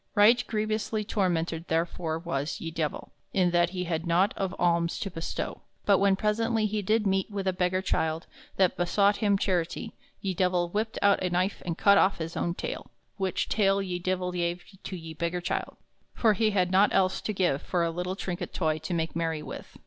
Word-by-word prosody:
Right 225 +4 +6
grievously 215 0 -1
tormented 175 -5 -1
therefore 165 0 -1
was 165 -4 -3
ye 165 - -5
Divell, 160 -2 -3 0.2
in 180 -2 +3
that 175 0 +3
he 180 0 -3
had 165 -1 -2
nought 180 +5 +3
of 195 -1 -2
alms 170 -1 +2
to 195 - -3
bestow; 165 -1 -4 0.2
but 200 -2 +5
when 195 -1 +4
presently 220 +2 +1
he 210 0 -1
did 215 +2 +1
meet 190 0 +1
with 200 -2 -4
a 190 - +2
beggar 180 +1 0
childe 160 -3 0 0.3
that 190 -2 +3
besought 200 +3 +3
him 205 -3 +2
charity, 185 +4 -1 0.3
ye 190 -1 -2
Divell 180 -1 +1
whipped 220 +3 -2
out 200 0 +4
a 185 - 0
knife 180 +3 0
and 170 -1 -2
cut 200 -1 +6
off 195 - +3
his 165 0 -5
own 170 0 -1
taile, - - -5 0.3
which 190 -3 -1
taile 195 -2 +2
ye 180 -2 -3
Divell 180 0 -1
gave 175 0 -2 0.2
to 190 - -4
ye 165 -2 -7
beggar 170 +2 -2
childe, 175 - -3 0.4
for 220 -2 +4
he 215 +2 +2
had 185 -3 +1
not 195 +2 +5
else 190 -1 +2
to - - -2
give 180 -8 +1
for 175 -2 0
a 165 - -1
lyttle 180 +2 -3
trinket 180 -2 -4
toy 155 -3 +1
to 160 +3 -3
make 165 -1 -2
merry 165 -2 -1
with. - - -9
185 Hz, 200 wpm, -28 LUFS, 170-200 Hz, 0.4 s, Right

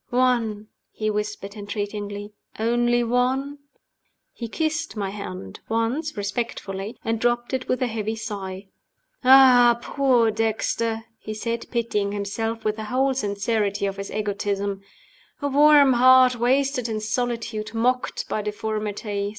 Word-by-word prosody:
"One?" 240 -4 +1 0.2
he 215 0 -2
whispered, 210 -1 -4
entreatingly. 205 0 -5 0.2
"Only 240 +2 +2
one?" 260 +4 0 0.7
He 235 - -6
kissed 315 +4 -2
my 200 -2 -3
hand 95 - -7
once, 230 +7 -1
respectfully 205 -1 -4
and 225 0 0
dropped 240 +1 0
it 260 -1 -2
with 255 +1 +1
a - - +3
heavy 220 -1 -3
sigh. 195 -3 -6 0.5
"Ah, 250 -2 +7
poor 245 -3 +2
Dexter!" 225 +1 -1 0.2
he 215 0 -6
said, 230 +1 -3
pitying 210 -4 -1
himself 225 +3 -3
with 215 0 0
the 220 - -5
whole 265 +4 +1
sincerity 205 -2 -1
of 195 0 -3
his 195 0 -5
egotism. 200 -1 -2 0.6
"A 285 - -1
warm 290 -1 +6
heart 255 +1 +6
wasted 250 +1 +1
in 215 -1 -2
solitude, 220 -1 -3
mocked 250 +2 0
by 215 - -2
deformity. 210 -1 -3
225 Hz, 130 wpm, -24 LUFS, 205-250 Hz, 0.7 s, Ah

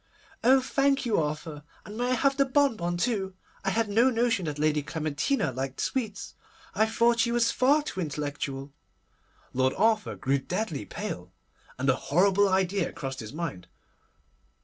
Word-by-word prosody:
'Oh! 260 +3 +6
thank 275 +1 +1
you, 225 -6 +2
Arthur; 150 0 -3 0.2
and 210 - -9
may 240 +2 -1
I - - +2
have 275 +3 +2
the 275 - +4
bonbon 255 -11 +1
too? 195 -2 -1 0.3
I 195 - +1
had 225 +3 +1
no 230 +5 +4
notion 230 -6 +1
that 150 -2 -3
Lady 150 0 +2
Clementina 155 - -1
liked 130 +1 -4
sweets. 220 -6 -3 0.4
I 220 - +3
thought 235 +1 +2
she 235 +1 +2
was 235 -1 +2
far 285 +4 +3
too 240 - -5
intellectual.' 145 -3 -4 0.8
Lord 130 +1 +1
Arthur 215 +1 +2
grew 135 +1 0
deadly 170 - -3
pale, - - -6 0.5
and 130 +2 -2
a 130 - +4
horrible 195 +7 +3
idea 190 0 +1
crossed 135 -1 -6
his 110 -2 -7
mind. 155 - -5
190 Hz, 160 wpm, -27 LUFS, 150-235 Hz, 0.8 s, Oh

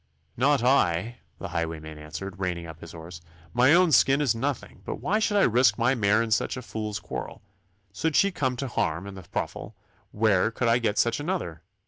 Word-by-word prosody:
'Not 135 +1 +2
I,' 120 -3 +2 0.2
the - - -6
highwayman 80 -2 -4
answered, 95 +6 -7
reining 90 -3 -2
up 80 -1 -11
his 85 - -10
horse. 80 0 -10 0.3
'My 125 +3 +5
own 180 -2 +4
skin 135 -1 +5
is 145 -6 +2
nothing, 130 +3 -4
but - - -4
why 215 +3 0
should 215 -2 +1
I 200 - +5
risk 120 -2 +4
my 120 +3 +2
mare 110 -2 +2
in 115 - -5
such 110 - +1
a 130 - -6
fool's 105 -2 -4
quarrel? - - -7 0.5
Should 160 +10 -1
she 200 - +4
come 130 -7 -1
to 135 +2 -4
harm 85 -7 -1
in 100 - -8
the 95 -3 -11
ruffle, 105 - -4 0.4
where 105 -2 +2
could 115 +1 -2
I 115 +1 +4
get 110 -3 -1
such 115 +1 +2
another? 145 - -3
115 Hz, 200 wpm, -26 LUFS, 90-130 Hz, 0.5 s, My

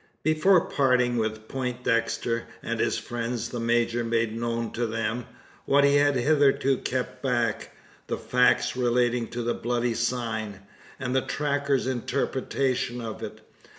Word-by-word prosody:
Before 155 +4 +4
parting 125 -5 +2
with 110 -1 -2
Poindexter 115 -2 -1 0.2
and - - -3
his - - +1
friends, 120 0 -3
the 120 - -4
major 120 0 +1
made 115 -1 0
known 115 0 -2
to 120 0 -1
them 115 +1 -2 0.4
what 140 +1 +4
he 140 0 +5
had 145 -1 +3
hitherto 135 0 +3
kept 125 0 -3
back 120 -5 -1 0.3
the - - -2
facts 125 0 +2
relating 120 -1 +1
to 120 +1 -4
the 120 - 0
bloody 120 0 -1
sign, 115 -4 -2 0.4
and 130 -1 -2
the 130 - +4
tracker's 140 -2 0
interpretation 130 0 -1
of 115 -2 -6
it. - - -7
120 Hz, 140 wpm, -26 LUFS, 115-130 Hz, 0.4 s, he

